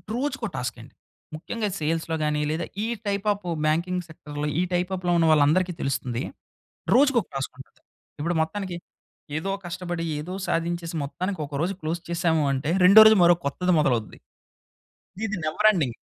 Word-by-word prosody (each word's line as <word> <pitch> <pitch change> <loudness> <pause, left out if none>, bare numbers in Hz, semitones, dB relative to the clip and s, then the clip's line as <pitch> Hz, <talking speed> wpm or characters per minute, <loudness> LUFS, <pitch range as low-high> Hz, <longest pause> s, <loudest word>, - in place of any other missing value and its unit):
రోజుకో 270 -1 -2
టాస్క్ 120 0 -3
అండి. 120 - -15 0.4
ముఖ్యంగా 210 +7 -3
సేల్స్‌లో 160 +1 -1
గానీ, 150 0 0
లేదా 160 +2 -2 0.2
ఈ - - 0 0.2
టైప్ 200 0 -1
ఆఫ్ 200 -2 -13 0.2
బ్యాంకింగ్ 175 +4 0
సెక్టర్‌లో 150 -2 -6
ఈ - - +3
టైప్ 180 +1 0
ఆ‌ఫ్‌లో 180 -1 -1
ఉన్న 165 - +3
వాళ్ళందరికీ 155 +5 +3
తెలుస్తుంది. 125 -2 -2 0.7
రోజుకొక 270 -3 +4
టాస్క్ 135 -1 -3
ఉంటుంది. 135 - -14 0.4
ఇప్పుడు 170 +3 -1
మొత్తానికి 185 +2 -3 0.6
ఏదో 195 +5 -2
కష్టపడి, 175 -1 -4
ఏదో 170 +5 -6
సాధించేసి, 170 0 -2
మొత్తానికి 175 +7 -4
ఒక 140 - -7
రోజు 185 +3 -1
క్లోజ్ 165 +2 -3
చేశాము 165 -2 +1
అంటే, 140 +4 -1
రెండో 205 +4 +10
రోజు 220 -1 +6
మరో 175 0 +6
కొత్తది 180 +5 +1
మొదలవుద్ది. 120 -7 0 1.1
ఇది 215 -1 -3
నెవర్ 210 +8 +4
ఎండింగ్. 140 - -1
170 Hz, 155 wpm, -25 LUFS, 150-185 Hz, 1.1 s, రెండో